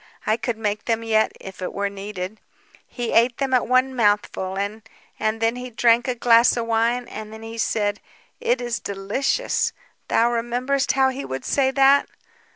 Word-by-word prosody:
I 215 - +2
could 235 0 -3
make 210 -1 -2
them 230 -1 0
yet 220 -1 +2
if 190 -1 -10
it 180 - -4
were 200 0 -1
needed. 200 0 -6 0.5
He 240 -2 -4
ate 235 +1 +3
them 275 -1 -1
at 250 - +3
one 255 +1 +2
mouthful, 205 -4 0
and... 205 +3 -3 0.4
and 215 +1 0
then 230 +2 +1
he 250 0 -6
drank 235 +1 +3
a 250 - 0
glass 235 0 +5
of 235 - -1
wine, 230 +2 +1
and 215 0 -8
then 220 0 -10
he 225 0 -7
said, 205 -2 0 0.4
'It 245 +2 +1
is 240 -1 -2
delicious.' 205 - -1 0.3
Thou 235 +1 +3
rememberest 245 +4 0
how 265 0 +3
he 265 +1 -5
would 130 0 -5
say 270 -2 +2
that? 275 +1 +4
230 Hz, 180 wpm, -23 LUFS, 210-250 Hz, 0.5 s, glass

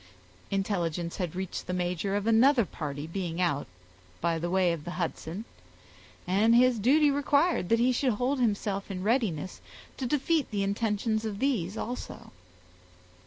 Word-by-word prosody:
Intelligence 175 -4 -1
had 180 -3 -3
reached 185 -1 -4
the 180 - -2
major 180 +2 -1
of 205 0 -1
another 235 +2 +5
party 145 -4 -5
being 170 0 -4
out, 170 -6 0 0.5
by 165 -1 0
the 175 +2 -2
way 180 -1 +3
of 160 -3 -6
the 175 - -6
Hudson, 175 +3 -4 0.8
and 210 +6 +3
his 250 -1 +4
duty 285 +7 +4
required 285 - +2
that 230 - +4
he 245 +2 +3
should 255 0 +1
hold 255 +5 0
himself 205 -4 -1
in 185 -2 -4
readiness 205 - 0 0.4
to 260 - -2
defeat 295 +2 +1
the 205 -2 -1
intentions 215 +2 0
of 215 -3 -3
these 215 -7 0
also. 245 +3 -6
200 Hz, 155 wpm, -28 LUFS, 180-245 Hz, 0.8 s, another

